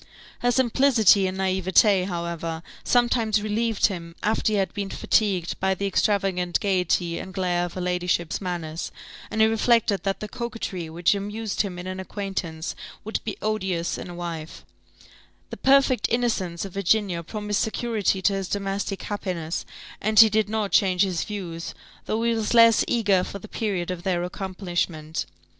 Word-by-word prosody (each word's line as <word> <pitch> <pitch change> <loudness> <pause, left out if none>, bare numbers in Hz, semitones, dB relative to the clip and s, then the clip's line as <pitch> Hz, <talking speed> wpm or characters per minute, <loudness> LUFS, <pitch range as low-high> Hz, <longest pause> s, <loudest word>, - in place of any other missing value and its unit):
Her 245 - +1
simplicity 240 -5 +4
and 185 0 -4
naïvete, 190 +1 +3
however, 170 -2 -4 0.2
sometimes 230 -3 +2
relieved 220 +1 +1
him, 170 -4 -3
after 215 0 +1
he - - +2
had 195 -1 0
been 200 -1 -3
fatigued 195 -6 0
by 190 0 +1
the 200 - -3
extravagant 190 -3 +1
gaiety 180 -3 0
and 190 - -7
glare 175 -2 0
of 175 - -7
her 185 - -4
ladyship's 180 -1 -1
manners; 170 -3 -4 0.4
and 220 - 0
he - - +8
reflected 225 -2 +2
that 195 -1 -1
the 215 - -5
coquetry 215 -8 -5
which 170 +3 +2
amused 205 +2 -2
him 195 -4 -4
in 180 - -7
an 185 0 -5
acquaintance 190 -4 -4 0.3
would 220 - -2
be 215 - -4
odious 190 -6 -1
in - - -7
a 175 - -8
wife: 165 -2 -6 0.9
the - - -6
perfect 265 -3 +4
innocence 210 -8 0
of 195 - -9
Virginia 195 -2 +1
promised 210 +4 -2
security 220 -4 0
to 200 - +3
his 195 -1 -2
domestic 195 0 -3
happiness, 180 -5 -3 0.3
and 215 +1 +3
he 225 -1 +10
did 215 -1 +2
not 215 -2 -1
change 185 -1 +4
his 185 -4 -1
views, 175 -5 -6 0.3
though 220 +1 0
he 235 0 +2
was 225 +1 -1
less 230 -1 +7
eager 205 -6 +2
for 200 - -6
the 210 - -11
period 195 -6 -2
of 180 -2 -5
their 175 -1 0
accomplishment. 175 -4 -3
195 Hz, 165 wpm, -25 LUFS, 180-215 Hz, 0.9 s, he